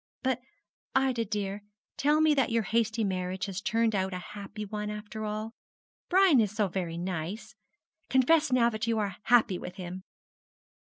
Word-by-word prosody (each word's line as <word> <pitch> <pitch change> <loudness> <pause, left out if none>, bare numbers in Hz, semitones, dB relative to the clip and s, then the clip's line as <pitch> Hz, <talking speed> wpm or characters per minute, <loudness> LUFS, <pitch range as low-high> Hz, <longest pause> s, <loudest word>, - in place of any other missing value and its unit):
But, 260 -1 0 0.5
Ida, 260 -4 +2
dear, 205 -1 -3 0.3
tell 295 +2 +3
me 310 -1 +5
that 270 -4 +2
your 230 -1 +1
hasty 225 +2 +1
marriage 185 -1 -2
has 195 0 -4
turned 230 0 +1
out 190 -1 0
a 180 - -7
happy 210 +1 -6
one 210 +1 -4
after 210 +1 -6
all. 215 +1 -4 0.6
Brian 370 -7 +6
is 210 - +1
so 215 -2 +1
very 170 -2 -3
nice. 180 +3 -4 0.6
Confess 295 +3 +4
now 235 -2 +4
that 220 +1 -3
you 230 -1 +1
are 200 -3 -2
happy 220 -6 +4
with 180 0 -7
him!' 185 -1 -6
215 Hz, 165 wpm, -29 LUFS, 190-235 Hz, 0.6 s, Brian